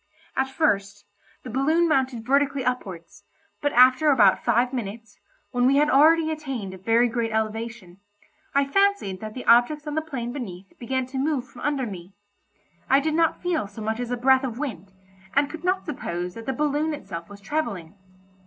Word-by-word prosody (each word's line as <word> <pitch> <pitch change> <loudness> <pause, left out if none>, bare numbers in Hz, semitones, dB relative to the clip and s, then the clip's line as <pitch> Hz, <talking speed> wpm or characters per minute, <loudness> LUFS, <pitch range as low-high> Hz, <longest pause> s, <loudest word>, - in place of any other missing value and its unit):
At 265 0 0
first, 205 -9 0 0.4
the 250 - -7
balloon 310 +7 +2
mounted 260 -6 0
vertically 275 0 +1
upwards, 200 -6 -4 0.4
but 290 - +1
after 255 +5 +6
about 215 -9 +4
five 245 +3 +2
minutes, 225 -2 -6 0.3
when 245 0 +2
we 275 - +4
had 300 +1 +3
already 315 +3 +5
attained 270 -11 -5
a - - -9
very 230 +5 +3
great 230 -1 -2
elevation, 220 -3 -4 0.6
I 280 0 +4
fancied 395 - +1
that 215 0 -7
the 255 - -7
objects 245 +6 +4
on 300 - -4
the 315 - 0
plain 255 -6 -5
beneath 195 -8 -8
began 260 +2 -2
to 265 +1 -5
move 275 -3 -1
from 245 - -14
under 280 -2 -1
me. 190 -3 -9 0.8
I 270 - +6
did 310 +2 -1
not 330 +1 +1
feel 340 - 0
so 215 +2 -9
much 220 +2 -2
as 245 -1 -3
a 245 - -2
breath 265 +2 +4
of 240 -3 -4
wind, 200 - -5 0.4
and 285 0 +2
could 325 0 -8
not 370 +1 0
suppose 180 - -4
that 230 +4 -10
the 265 - 0
balloon 300 +2 0
itself 170 -11 -8
was 205 0 -11
travelling. 200 - -3
255 Hz, 185 wpm, -24 LUFS, 215-290 Hz, 0.8 s, after